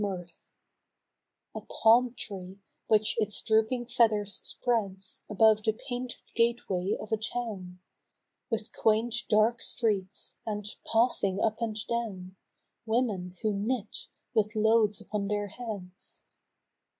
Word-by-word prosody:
I02 - - 0
A 205 - +1
Dream 185 -2 -3
of 175 - -11
the 170 - -25
South, - - -18 1.0
A - - -5
palm 235 +2 +4
tree 190 -2 -7 0.3
which 215 -1 +3
its 210 -2 0
drooping 220 +3 +2
feathers 220 -4 +3
spreads 195 -5 -1
Above 215 0 +5
the 220 0 +1
painted 245 +1 -6
gateway 230 -5 +1
of 210 - -8
a 220 - +3
town 210 -5 -4 0.7
With 225 -2 -2
quaint 220 +2 +2 0.2
dark 220 +2 +4
streets, 205 -5 0
and, 210 -2 -3 0.2
passing 225 -4 +3
up 220 +2 0
and 220 -2 -1
down,; 195 -6 -3 0.5
Women 210 -6 0
who 215 -1 +2
knit, 210 +2 -2 0.3
with 215 -1 +1
loads 215 -1 +3
upon 205 -1 -3
their 205 0 -1
heads. 200 -5 -7
215 Hz, 135 wpm, -29 LUFS, 200-230 Hz, 1.0 s, Above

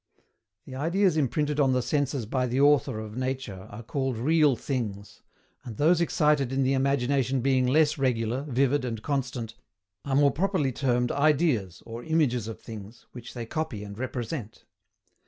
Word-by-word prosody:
The 130 - -10
ideas 170 +6 +1
imprinted 150 +1 0
on 135 -2 +4
the 125 -1 +1
Senses 140 -4 -1
by 125 +3 -1
the 125 +2 -1
Author 140 -6 +3
of 110 0 -7
nature 130 -7 -4
are 105 +3 -9
called 130 0 -2
REAL 150 +2 +3
THINGS; 105 -6 -4 0.4
and 115 -4 -8
those 170 +3 +4
excited 150 -5 +2
in 135 0 +1
the 130 +1 +2
imagination 135 -1 +1
being 130 0 +2
less 150 +2 +3
regular, 125 -1 0
vivid, 135 +2 +2
and 115 -4 -4
constant, 125 -5 -2 0.5
are 135 -1 -1
more 140 0 +5
properly 175 -4 0
termed 125 -1 0
IDEAS, 140 - +1
or 115 +1 -7
IMAGES 140 -9 +1
OF 115 - -7
THINGS, 110 0 -10
which 120 0 -10
they 120 -1 -4
copy 125 -5 -4
and 100 -1 -8
represent. 120 -2 -5
130 Hz, 160 wpm, -27 LUFS, 115-145 Hz, 0.5 s, more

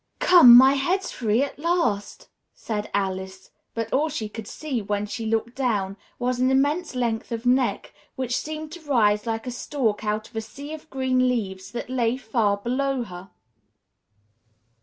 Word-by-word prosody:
"Come, 335 -10 +8
my 265 +2 +7
head's 355 +8 0
free 225 +1 +1
at 280 - -6
last!" 335 - -1 0.3
said 210 -2 -4
Alice; 190 -1 -3 0.2
but 230 -1 -3
all 300 +4 +2
she 250 -8 -4
could 215 0 -8
see, 280 -7 -4
when 205 0 -2
she 225 +2 -5
looked 225 +2 -1
down, 210 -8 -1 0.2
was 250 0 -1
an 255 +1 +3
immense 285 +4 +1
length 235 -1 -2
of 230 +1 -4
neck, 250 +1 +1 0.2
which 250 -1 -2
seemed 310 +1 -5
to 345 +1 -9
rise 210 -4 +3
like 225 +1 -2
a 250 - -4
stalk 240 -4 -2
out 215 0 -2
of - - -22
a 220 - -1
sea 285 +7 -9
of 315 0 -10
green 255 -1 +1
leaves 190 -6 -3
that 240 - -4
lay 245 -1 0
far 220 -5 0
below 255 +4 -1
her. 180 -2 -10
240 Hz, 170 wpm, -24 LUFS, 210-270 Hz, 0.3 s, Come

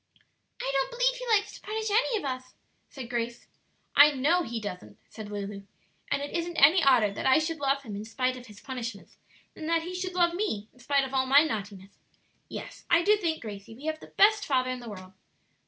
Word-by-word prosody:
"I 270 - -2
don't 270 -1 +1
b'lieve - - +2
he - - -6
likes 430 -2 +2
to - - -12
punish 435 0 -3
any 455 +2 +2
of 350 - -5
us," 255 -1 -5 0.3
said 265 -4 -8
Grace. 235 0 -3 0.5
"I 290 +1 +9
know 300 +6 +2
he 235 -8 -4
doesn't," 180 - -7
said 215 -2 -9
Lulu. 205 -1 -5 0.5
"And 280 - 0
it 290 - -6
isn't 340 0 -2
any 315 +6 +7
odder 245 -7 +5
that 200 - -3
I 260 - +6
should 320 0 -1
love 275 0 0
him 215 -5 -7
in 205 - -5
spite 255 +3 -1
of 250 0 -11
his 210 -1 -13
punishments, 235 -6 -7 0.4
than 315 - -7
that 330 0 +1
he 355 +2 -6
should 365 0 -4
love 345 -1 +3
me 285 - -2
in 250 - -23
spite 280 +2 +1
of 265 0 -6
all 260 -1 +1
my 280 +3 +7
naughtiness. 200 -7 -6 0.5
Yes, - - -8
I 340 0 +5
do 420 +4 +5
think, 330 -8 -2
Gracie, 205 0 -8
we 275 +6 -12
have 315 0 -2
the - - -12
best 420 +1 +4
father 255 -3 +1
in 255 - -4
the 240 -2 -9
world." 185 -2 -10
270 Hz, 220 wpm, -28 LUFS, 230-340 Hz, 0.5 s, I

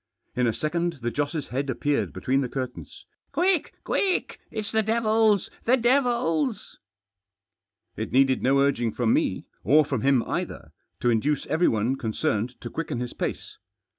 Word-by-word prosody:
In 125 0 +2
a - - +3
second 170 +5 -1
the 120 - 0
Joss' 145 +2 -2
head 135 +2 -2
appeared 145 +3 0
between 135 +1 0
the 125 - -2
curtains. 130 -1 -6
" - - -50
Quick! 365 -3 +1
quick! 385 -2 0
It's 215 -2 -4
the 220 - +3
devils— 220 -2 +2
the 255 +3 +4
devils! 240 - +1 0.6
" 100 -1 -58
It - - -4
heeded 135 0 +3
no 135 +2 +3
urging 125 -5 +1
from 120 -2 +1
me - - 0
— - - -42
or 150 +2 +5
from 135 -5 -2
him 135 -3 +3
either - - -4
— - - -53
to 120 - +3
induce 140 +6 +1
everyone 130 -6 +1
concerned 110 +1 -2
to 120 - -7
quicken 165 -7 -3
his 125 0 -4
pace. - - -5
140 Hz, 165 wpm, -26 LUFS, -, 0.6 s, or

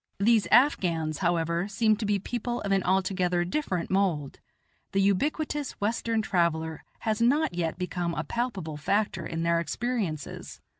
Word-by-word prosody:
These 220 +1 +3
Afghans, 175 - +3
however, 170 0 0
seem 215 +1 +2
to 210 -1 -3
be 205 -1 +2
people 240 +4 -3
of 200 - -3
an 195 -1 +3
altogether 185 -1 +1
different 185 - -2
mould; 180 -8 0 0.5
the 195 - +2
ubiquitous 285 - 0
Western 225 +1 -1
traveller 160 -5 0 0.2
has 220 0 -1
not 280 - +3
yet 170 -2 -2
become 175 -2 -2
a - - -2
palpable 195 -11 -3
factor 200 +8 0
in 165 0 -3
their 170 0 +2
experiences. 185 - -3
195 Hz, 145 wpm, -28 LUFS, 170-225 Hz, 0.5 s, These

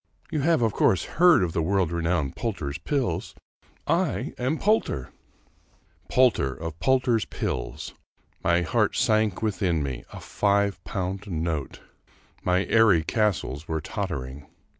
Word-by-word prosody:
You 155 - 0
have 160 -3 +3
of 110 -2 +1
course 90 - +3
heard 175 - +5
of 85 -2 -2
the 85 - 0
world 90 0 +1
renowned 85 -4 -1
Poulter's 80 -11 -3
Pills. 135 - -2 0.5
I 165 0 0
am 130 +6 0
Poulter! 205 - 0 0.5
" - - -37
Poulter 115 - +3
of 80 0 -7
Poulter's 125 -2 +2
Pills! - - -4 0.5
My 85 0 +3
heart 105 +5 +1
sank 110 -5 +1
within 95 -7 0
me 65 -4 -4
I - - -9
A - - -9
iive 100 -1 +1
pound 95 +1 -4
note! 80 -5 -3 0.6
My 90 +2 +2
airy 105 -8 +4
castles 95 - -1
were 80 -1 -1
tottering 70 -1 -5
95 Hz, 140 wpm, -25 LUFS, 80-115 Hz, 0.6 s, heard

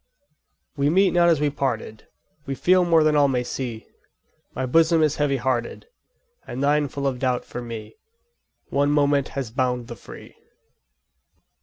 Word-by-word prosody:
We 140 +1 +2
meet 190 +3 +3
not 175 -1 +4
as 165 -4 +3
we 150 -1 +1
parted, 120 -6 -4 0.4
We 135 - -3
feel 180 +7 +3
more 165 -2 +4
than 155 -1 +2
all 145 -1 +5
may 125 -2 0
see; 120 -3 -5 0.7
My 130 - -2
bosom 160 +4 +3
is 155 -1 +1
heavy 145 -2 +1
hearted, 125 - -2 0.6
And 130 +3 -4
thine 145 +1 +2
full 140 +1 -5
of 130 -2 -1
doubt 125 -1 -1
for 120 - -7
me: 110 -2 -8 0.7
One 140 +1 +1
moment 145 -1 +2
has 130 -5 -3
bound 125 -1 -1
the 120 - -6
free. - - -13
140 Hz, 160 wpm, -23 LUFS, 125-150 Hz, 0.7 s, all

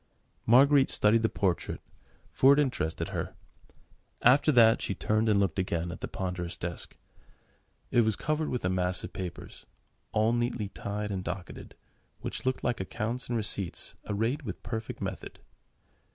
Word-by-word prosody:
Marguerite 135 +3 +6
studied 110 +2 +3
the 110 - +2
portrait, 95 -4 -1 0.5
for 135 +2 +6
it 140 - +3
interested 125 - -1
her: - - -4 0.9
after 140 +5 +6
that 115 -4 +6
she 100 - -2
turned 110 +1 +1
and 105 -2 +4
looked 95 -3 +1
again 85 -2 -1
at 85 - -8
the - - -3
ponderous 90 -2 -4
desk. 85 0 -6 0.9
It 120 - +5
was 110 -2 +2
covered 155 +6 -1
with 125 -6 -2
a - - +2
mass 90 0 0
of - - -7
papers, 90 -3 -7 0.4
all 110 +2 +2
neatly 120 -3 -1
tied 105 +1 -4
and 95 -2 -3
docketed, 90 +1 -7 0.5
which - - -4
looked 130 - 0
like 120 - 0
accounts 110 +6 -3
and 120 - -1
receipts 100 -4 -3 0.2
arrayed 115 +8 0
with 135 - -7
perfect 110 -1 -5
method. - - -5
110 Hz, 155 wpm, -29 LUFS, 95-120 Hz, 0.9 s, Marguerite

